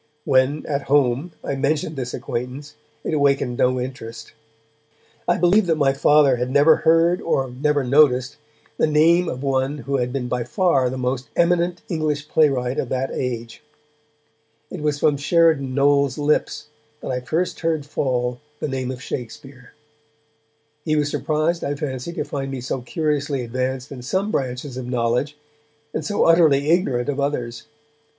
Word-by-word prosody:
When, 130 +3 +2
at 140 -2 -3
home, 140 +3 +2
I - - -2
mentioned 145 +3 -1
this 125 -2 -4
acquaintance, 130 +5 -5 0.3
it - - -3
awakened 140 -4 +1
no 130 0 +2
interest. 115 -3 -7 0.9
I - - +3
believe 180 +3 +3
that 165 - +3
my 140 -3 +3
Father 140 -1 +4
had 125 +1 -2
never 145 +4 +5
heard, 165 +2 +3
or 135 -6 -1
never 145 +2 0
noticed, 130 -1 +3 0.4
the - - +2
name 165 +3 +4
of 130 +2 -5
one 135 +1 0
who 140 0 0
had 125 -1 -1
been 130 -2 -3
by 125 0 -1
far 135 - +1
the 130 - -5
most 125 +1 -2
eminent 175 0 +1
English 155 -3 -2
playwright 135 -4 +2
of 125 - -2
that 130 +1 -2
age. 120 -3 -4 1.1
It 180 - -6
was 150 -1 0
from 145 -1 +2
Sheridan 145 -3 +2
Knowles' 140 -1 +3
lips 150 0 0 0.3
that - - -4
I 125 - -1
first 160 +8 -2
heard 160 -3 -1
fall 125 -4 -1 0.2
the - - -2
name 130 -2 -3
of 130 0 -6
Shakespeare. 125 +1 -8 1.1
He 155 -1 0
was 145 -1 0
surprised, 155 +2 -1
I 145 - -2
fancy, 135 +1 -4
to - - -2
find 140 -2 -4
me 135 -1 -4
so 130 +1 -3
curiously 145 0 -1
advanced 130 +2 -3
in 130 -3 -7
some 190 +11 -1
branches 130 -2 -3
of 125 -1 -5
knowledge, 125 +4 -1 0.6
and 155 - -2
so 205 +7 0
utterly 155 -3 +4
ignorant 135 -9 +1
of 145 -1 -2
others. 125 -5 -3
140 Hz, 160 wpm, -22 LUFS, 125-150 Hz, 1.1 s, never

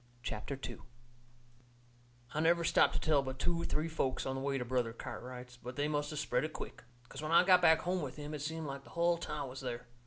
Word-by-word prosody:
CHAPTER 130 +6 -4
II - - -8 1.5
I 155 - -1
never 170 +2 +4
stopped 170 - +4
to - - +1
tell 155 -3 +3
but 130 -1 -5
two, 170 +4 0
three 155 0 0
folks 145 -5 -1
on 130 - -1
the 135 - -3
way 135 0 0
to 125 - -2
Brother 120 -2 0
Cartwright's, 125 +1 -7
but 125 +1 -8
they 145 +1 +1
must 145 0 -1
of 150 - -5
spread 125 -3 +1
it 155 0 -3
quick. - - -7 0.2
'Cause 135 - -8
when 155 +1 -3
I 170 - +8
got 180 -1 +6
back 160 -2 +6
home 180 +1 0
with 140 -4 -4
him 150 0 -6
it 150 - -4
seemed 160 +1 -3
like 140 -1 -5
the - - -15
hull 170 0 +2
town 150 -4 -3
was 130 +1 -7
there. 125 -2 -4
145 Hz, 240 wpm, -34 LUFS, 130-160 Hz, 1.5 s, I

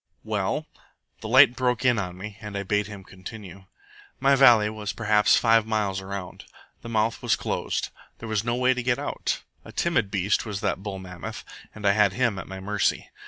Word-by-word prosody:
"Well?" - - -1 0.5
The - - -7
light 130 +1 +7
broke 125 0 0
in 120 -3 +4
on 90 -2 -4
me, 100 +2 -7
and 105 -2 -6
I 100 - -2
bade 105 +1 0
him 100 -2 -9
continue. 95 0 -11 0.5
"My 140 +1 +4
valley 120 -6 +6
was 105 -1 -4
perhaps 105 -2 +3
five 115 -1 +3
miles 105 -3 -1
around. 95 -1 -7 0.4
The 115 - -8
mouth 110 0 0
was - - +2
closed. - - -2 0.3
There 115 - -8
was 110 -1 0
no 120 0 0
way 130 +1 +3
to 125 - -3
get 120 0 +1
out. - - -3 0.2
A - - -11
timid 165 -12 0
beast 100 +1 +1
was 105 -4 -5
that 95 - -1
bull 100 -1 -5
mammoth, 90 -2 -8 0.3
and 110 -1 -7
I 100 - +6
had 100 -1 +3
him 115 -3 0
at 90 - -8
my 95 0 -7
mercy. 100 +1 -1
105 Hz, 200 wpm, -25 LUFS, 100-115 Hz, 0.5 s, light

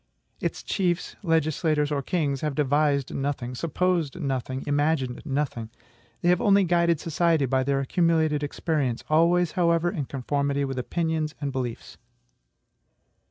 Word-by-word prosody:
Its - - -3
chiefs, 180 -3 -1
legislators, 155 -3 +1
or 145 -1 0
kings 140 -3 -1
have 150 -3 -2
devised 145 -1 +1
nothing, 135 -3 -3
supposed 170 +2 -1
nothing, 130 -3 -3
imagined 145 -3 0
nothing. 135 -6 -2 0.5
They 175 - +3
have 180 0 +3
only 200 -1 +5
guided 170 -2 +2
society 165 -2 +1
by 130 0 +1
their 140 +1 +1
accumulated 160 0 +1
experience, 145 -4 -1
always 170 +2 +4
however 170 -1 +2
in 155 -8 -3
conformity 140 +1 -1
with 135 -1 -3
opinions 160 +2 -2
and 140 -2 -2
beliefs. 125 -3 -5
150 Hz, 130 wpm, -26 LUFS, 135-170 Hz, 0.5 s, only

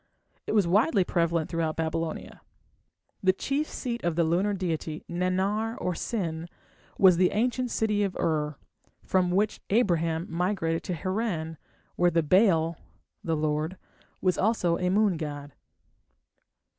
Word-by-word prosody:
It - - -1
was 205 -4 +4
widely 200 - +3
prevalent 170 -2 0
throughout 165 -2 -1
Babylonia. 165 0 -3 0.8
The 185 -1 +4
chief 280 +9 -1
seat 240 -2 -4
of 170 -2 0
the 170 - +3
lunar 185 +6 +1
deity, 165 -4 -3
Nannar 190 +6 -1
or 180 - -1
Sin, 170 -4 -3 0.5
was 185 -3 +6
the 180 0 +4
ancient 245 +3 0
city 210 -2 0
of 195 -3 -1
Ur, 150 -2 0 0.5
from 185 -1 +1
which 200 +4 0
Abraham 170 -6 +1
migrated 170 -1 -1
to 180 - -2
Harran, 175 -4 -3 0.4
where 175 0 +4
the 165 -1 +1
"Baal" 165 -2 +3 0.5
(the 165 -4 0
lord) 155 +3 -1 0.4
was 185 -3 +1
also 185 -5 +1
a 180 -1 +1
moon 200 -2 +3
god. 145 -2 -6
180 Hz, 135 wpm, -27 LUFS, 165-205 Hz, 0.8 s, was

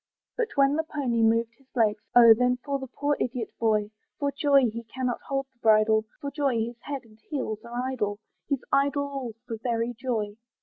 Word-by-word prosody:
But 475 -2 0
when 275 +1 +4
the 320 - +1
pony 270 -7 -1
moved 230 +1 +3
his 270 - -26
legs, 215 -3 +2
Oh! 235 -2 +10
then 250 +2 +2
for 280 -1 -1
the 265 - -6
poor 290 +3 -1
idiot 245 -2 -3
boy! 215 -2 +1 0.3
For 285 -1 0
joy 280 -2 +4
he 230 +1 -6
cannot 250 +1 -3
hold 275 0 -1
the 240 - -40
bridle, 220 -1 +4
For 280 - -4
joy 280 -5 0
his 230 +1 -3
head 280 +1 -5
and 215 -1 -20
heels 255 -8 -2
are 240 +1 -4
idle, 210 -6 -2 0.3
He's 280 -3 -1
idle 285 +1 +2
all 275 -5 -5
for 230 -2 -5
very 235 0 -1
joy. 220 -4 -3
245 Hz, 200 wpm, -27 LUFS, 225-275 Hz, 0.3 s, Oh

